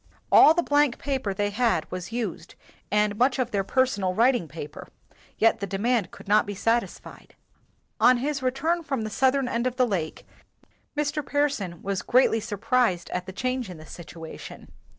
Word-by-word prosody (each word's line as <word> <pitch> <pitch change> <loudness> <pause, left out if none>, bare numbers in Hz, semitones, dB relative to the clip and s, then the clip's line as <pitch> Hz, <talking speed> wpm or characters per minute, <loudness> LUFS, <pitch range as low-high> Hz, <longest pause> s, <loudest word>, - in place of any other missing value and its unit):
All 315 - +8
the 345 - +2
blank 290 -4 +2
paper 265 -7 -2
they 205 +1 -1
had 230 +2 +1
was 185 +3 -6
used 215 -7 -4 0.4
and 210 0 +2
much 255 +1 +3
of 250 -2 -1
their 200 -1 0
personal 200 -5 0
writing 235 -5 +3
paper; 150 0 -9 0.5
yet 225 - +3
the 200 - -3
de 195 - -3
mand 225 -3 +1
could - - -14
not 210 +1 +3
be 205 - -4
satisfied. 230 +4 -2 0.6
On 250 0 +6
his 280 +3 -2
return 275 +7 0
from 270 -7 -3
the 215 - -5
southern 265 +2 +2
end 235 0 -1
of 250 - -3
the 255 -1 +3
lake, 180 -9 -3 0.7
Mr. 295 0 -1
Pearson 275 - -1
was 195 -1 -2
greatly 245 -2 +3
surprised 210 -3 0
at 180 +1 -3
the - - -5
change 255 +2 -2
in 180 - -8
the 155 - -12
situation. 165 -1 -10
230 Hz, 175 wpm, -25 LUFS, 195-260 Hz, 0.7 s, All